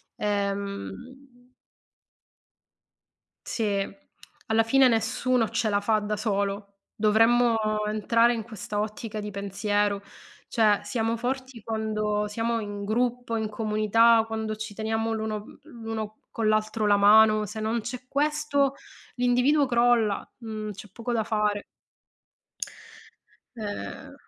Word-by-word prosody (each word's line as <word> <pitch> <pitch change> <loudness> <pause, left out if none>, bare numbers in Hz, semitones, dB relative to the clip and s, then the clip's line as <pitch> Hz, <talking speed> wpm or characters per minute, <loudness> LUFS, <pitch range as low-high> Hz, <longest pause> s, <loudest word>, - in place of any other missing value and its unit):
ehm 200 -1 -2 2.6
Sì, 230 - -2 0.8
alla 220 0 +3
fine 260 +3 +5
nessuno 230 +1 +1
ce 230 -1 0
la 200 -1 +2
fa 215 +1 +2
da 210 0 -3
solo. 200 -1 -2 0.2
Dovremmo, 225 +3 +4 0.3
entrare 230 +3 +3
in 225 - -3
questa 210 -2 -5
ottica 215 +1 -4
di 210 0 -5
pensiero 200 +1 -1 0.5
cioè 215 -3 +3
siamo 225 +2 -1
forti, 255 0 -4
quando 215 -1 -1
siamo 230 +2 -1
in 205 -1 -5
gruppo, 240 +2 -1
in 220 -1 -2
comunità, 220 +1 +3
quando 220 -1 -3
ci 220 -1 -6
teniamo 220 +1 -1
l'uno 220 -1 -2
mhmm, - - -15 0.3
l'uno 220 -1 -4 0.2
con 225 -2 -1
l'altro 215 0 +1
la 205 0 +5
mano, 215 +1 +6
se 220 +2 -7
non 225 +2 -1
c'è 250 +3 -7
questo, 285 -1 +1 0.4
l'individuo 250 +4 +3
crolla, 235 -4 +2
mhmm, 215 -2 -5
c'è 200 +1 -11
poco 235 +4 -4
da 225 -2 +1
fare. 210 -1 0 1.9
Eh. 205 - -6
220 Hz, 120 wpm, -26 LUFS, 210-235 Hz, 2.6 s, mano